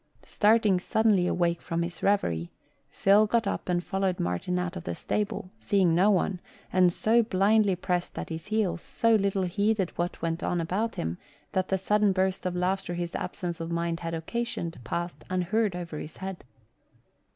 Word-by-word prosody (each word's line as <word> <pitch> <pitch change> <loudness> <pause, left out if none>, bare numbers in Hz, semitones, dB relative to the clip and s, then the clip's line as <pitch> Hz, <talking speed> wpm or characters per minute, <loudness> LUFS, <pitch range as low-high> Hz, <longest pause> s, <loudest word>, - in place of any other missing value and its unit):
Starting 210 -3 +3
suddenly 205 -1 +2
awake 170 -1 +1
from 170 0 -2
his 170 0 -6
revery, 85 - +1 0.4
Phil 205 +2 +4
got 230 +1 +1
up 200 - -3
and 175 0 +1
followed 190 -1 -1
Martin 90 - -1
out 180 0 -2
of 180 - -6
the - - -4
stable, 200 -3 -2
seeing 195 -5 +2
no 185 +5 +4
one, 190 -1 +1 0.3
and 180 -1 +5
so 225 +6 +3
blindly 205 -1 +3
pressed 180 0 -2
at - - -4
his 160 0 -6
heels, 210 -6 0
so 230 0 +1
little 200 -2 +2
heeded 200 +1 +1
what 175 +1 -1
went 165 +1 -2
on 175 - 0
about 190 +7 -1
him, 80 +2 -3 0.3
that 185 -1 0
the 190 - +1
sudden 210 +2 +2
burst 185 0 0
of 180 - -3
laughter 180 0 -1
his 175 0 -3
absence 175 -3 -4
of 165 0 -4
mind 170 0 -1
had 165 -1 -3
occasioned 170 0 -3
passed 170 +9 -4
unheard 185 +3 0
over 170 -4 -5
his 155 - -8
head. 190 -1 -6
185 Hz, 175 wpm, -28 LUFS, 170-205 Hz, 0.4 s, and